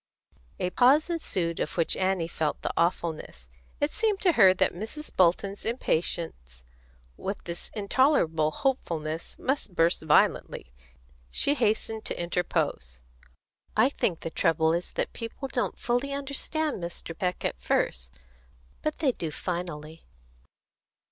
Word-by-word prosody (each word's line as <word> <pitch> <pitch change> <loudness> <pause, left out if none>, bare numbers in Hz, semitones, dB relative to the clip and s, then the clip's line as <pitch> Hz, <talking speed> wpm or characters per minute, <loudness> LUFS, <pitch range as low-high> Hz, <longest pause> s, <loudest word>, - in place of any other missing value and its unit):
A 180 - -1
pause 280 - +5
ensued, 180 - -2
of 150 - -3
which 165 - +2
Annie 185 -3 +1
felt 160 -2 -2
the - - -1
awfulness. 160 - -1 0.3
It 290 +1 +1
seemed 425 -3 +1
to 370 - +5
her 190 - +7
that 185 - +2
Mrs. 225 - -6
Bolton's 190 +3 +2
impatience 160 - -2 0.5
with 200 +1 -4
this 170 0 -4
intolerable 200 - +3
hopefulness 165 - -2
must 260 -8 -2
burst 165 +1 +3
violently. 150 - +2 0.6
She 280 - +2
hastened 220 -3 0
to - - -3
interpose. 65 - -1 0.7
"I 255 - +6
think 180 - -1
the 165 - -4
trouble 160 0 +2
is 175 +1 -2
that - - -2
people 230 +4 -5
don't 250 -2 -2
fully 245 +4 0
understand 280 - -2
Mr. 170 -1 -5
Peck 180 +1 -2
at - - -2
first. 60 0 0 0.7
But 305 - -2
they 285 -5 +2
do 165 -9 -4
finally." 165 -1 -5
180 Hz, 130 wpm, -28 LUFS, 160-260 Hz, 0.7 s, her